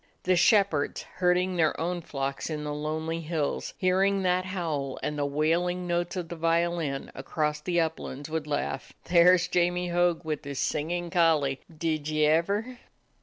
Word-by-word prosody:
The 185 0 +3
shepherds, 185 -5 +3
herding 180 0 +2
their 160 -2 +2
own 175 +1 -2
flocks 135 -2 -4
on 150 -1 -3
the 150 0 -3
lonely 160 +2 -3
hills, 155 -2 -2
hearing 195 +1 +2
that 180 0 +1
howl 160 -8 -3
and 150 - -2
the 145 -1 -1
wailing 170 +5 0
notes 175 +1 -1
of 180 -2 -3
the 170 - -5
violin 165 -3 0
across 150 +2 -2
the 175 +2 0
uplands, 155 -3 -3
would 160 -1 -3
laugh: 75 - -3
"There 180 +1 +6
's 175 +1 -2
Jamie 180 0 +1
Hogg, 175 -1 +1
with 155 -2 -3
his 140 -1 -6
singin' 170 +5 -1
collie. 155 -6 +2 0.2
Did 155 -2 -1
ye 155 0 +2
ever?" 200 +11 +1
165 Hz, 165 wpm, -28 LUFS, 150-180 Hz, 0.2 s, There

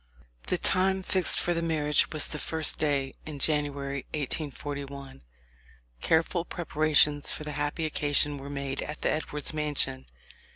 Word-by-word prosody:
The - - +1
time 190 +1 +3
fixed 185 0 +2
for 175 - +1
the 165 - -1
marriage 150 -3 +1
was 155 -2 -1
the 150 - -4
first 160 -1 +1
day 140 -3 0
in 150 -2 -6
January, 140 -2 -1
1841. 140 - -4 0.8
Careful 165 +2 +2
preparations 155 -3 +2
for - - -5
the 150 - -5
happy 145 +2 -2
occasion 145 -1 +1
were 140 +1 -8
made 140 -1 -3
at 150 - -6
the - - +2
Edwards 150 -1 -2
mansion. 145 - +1
150 Hz, 140 wpm, -28 LUFS, 140-155 Hz, 0.8 s, time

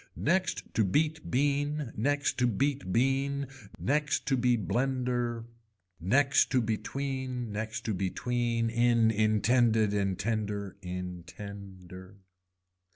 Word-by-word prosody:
Next 185 +5 0
to 110 - +3
beat 150 - 0
bean, 145 0 0
next 145 +6 0
to 125 - +4
beat 135 -1 -1
bean 135 +4 +1 0.3
next 150 +2 0
to 135 - +2
be 125 -1 +2
blender, 120 0 -1 0.5
next 130 - +3
to 130 - +3
between, 125 +1 -3
next 110 +2 -4
to 110 - 0
between 115 +4 -1
in 120 -1 +3
intend 110 +2 +3
intender. 105 -1 0
In 90 -1 -5
tender. 95 0 -10
120 Hz, 105 wpm, -30 LUFS, 105-135 Hz, 0.5 s, to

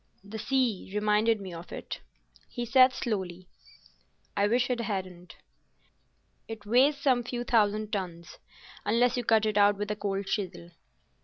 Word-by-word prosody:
"The 210 +2 -7
sea 250 -7 0
reminded 210 +1 +2
me 190 -3 -7
of 170 +1 -9
it," - - -6 0.5
he 240 -1 -4
said 255 +2 +6
slowly. 185 -7 -4 0.9
"I 205 0 +3
wish 245 +3 +1
it 245 - -1
hadn't. 185 -5 -5 1.1
It 220 -2 -8
weighs 260 +7 +4
some 260 -3 +2
few 240 0 -4
thousand 215 -2 +1
tons—unless 205 +6 -2
you 245 - -1
cut 220 -1 +3
it 210 -1 +1
out 205 0 +5
with 205 +1 -3
a - - -1
cold 200 -1 -3
chisel." 180 -4 -4
210 Hz, 145 wpm, -28 LUFS, 195-240 Hz, 1.1 s, said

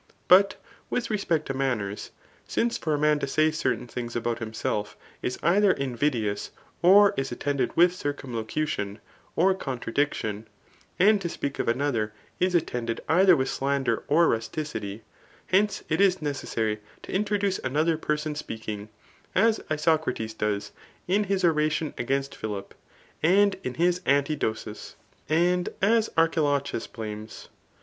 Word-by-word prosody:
But 195 +2 +6 0.3
with 240 -2 -2
respect 170 -7 0
to 135 - -3
manners, 120 -7 -2 0.4
since' 235 0 0
for 155 -2 -1
a - - -1
man 150 0 +3
to 140 - -2
say 155 +3 +3
certain 155 -5 -1
things 120 0 -6
about 120 0 -1
himself, 110 -2 -3 0.2
is 125 - -2
either 195 +2 +4
invidious, 120 -6 -1 0.3
or 200 +3 +7
is 135 0 -2
at* - - -6
tended 140 -1 -1
with 175 +1 +6
circumlocution 125 - -3 0.4
or 190 +3 +4
contradiction; 120 - -2 0.5
and 205 +2 +5
to 170 - -2
speak 140 -3 -4
of - - -1
another 120 -3 +1
person 105 0 -24 0.2
is 180 0 +2
attended 120 -8 -1
either 185 +2 +6
with 130 0 0
slander 135 -4 0
or 165 +3 +4
rusticity; 115 -3 -3 0.2
— - - -29
Whence, 200 +1 +2
it 155 +5 +1
is 190 -2 +4
necessary 115 -7 -2 0.2
to - - -8
introduce 200 -1 0
another 155 +5 +1
person 150 0 -2
speaking, 110 -7 -6 0.5
as 225 -1 +4
Isocrates 155 -7 0
does 105 -2 -2 0.4
in 200 +3 +2
his 195 -1 0
oration 155 -1 +1
against 135 +3 -2
Philip, 100 -2 -5 0.5
and 195 +4 +4
in 125 - -4
his 175 +1 +2
Antidosis 140 -7 -1 0.2
}. - - -34
and 175 +3 +2
as 220 +3 +3
Archilochus 145 -6 +1
.bh^nes. 110 -1 -8
145 Hz, 140 wpm, -26 LUFS, 115-175 Hz, 0.5 s, or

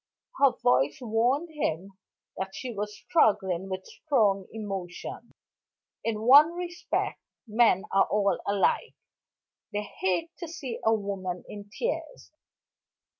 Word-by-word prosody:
Her 275 -2 +6
voice 130 +3 +3
warned 250 +7 +1
him 195 - -2 0.4
that 190 0 -5
she 245 +3 -5
was 210 0 -4
struggling 195 - +2
with 190 0 -4
strong 210 - +1
emotion. 195 -5 -6 0.7
In 220 -2 -1
one 290 +7 +8
respect, 350 0 -3 0.3
men 220 -3 +4
are 195 - +5
all 200 -1 +1
alike; 200 -1 +1 0.8
they 210 0 -2
hate 200 - -2
to 345 - -5
see 295 -7 -6
a 220 - +4
woman 195 -4 -2
in 205 0 -9
tears. - - -4
210 Hz, 120 wpm, -28 LUFS, 195-270 Hz, 0.8 s, one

